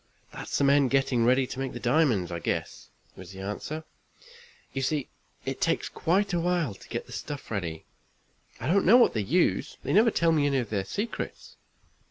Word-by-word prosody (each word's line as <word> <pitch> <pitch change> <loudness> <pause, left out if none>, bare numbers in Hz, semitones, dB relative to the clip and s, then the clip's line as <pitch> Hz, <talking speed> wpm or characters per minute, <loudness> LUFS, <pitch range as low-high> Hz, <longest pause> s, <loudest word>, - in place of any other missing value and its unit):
"That's - - -4
the - - +1
men 140 0 +5
getting 130 -3 +2
ready 130 +2 +4
to 125 - -7
make 135 -1 -4
diamonds, 120 - +2
I 85 - -3
guess," - - -4 0.3
was 95 0 -11
the 95 - -8
answer. 105 +11 -5 0.9
"You 135 - -2
see 140 +1 -1 0.4
it - - -4
takes - - +1
quite 195 +3 0
a 175 - +2
while 170 - 0
to 95 - -16
get - - -4
the - - -15
stuff 145 -5 -6
ready. 85 -7 -4 0.7
I - - -6
don't 190 +7 +3
know 230 +6 +8
what 245 - +5
they 110 - 0
use 165 - +1
they - - -1
never 220 +4 +6
tell 170 -6 +2
me 150 -3 +3
any 140 -1 +1
of 120 -5 -2
their 100 -3 -1
secrets." 215 - -5
135 Hz, 195 wpm, -27 LUFS, 110-165 Hz, 0.9 s, know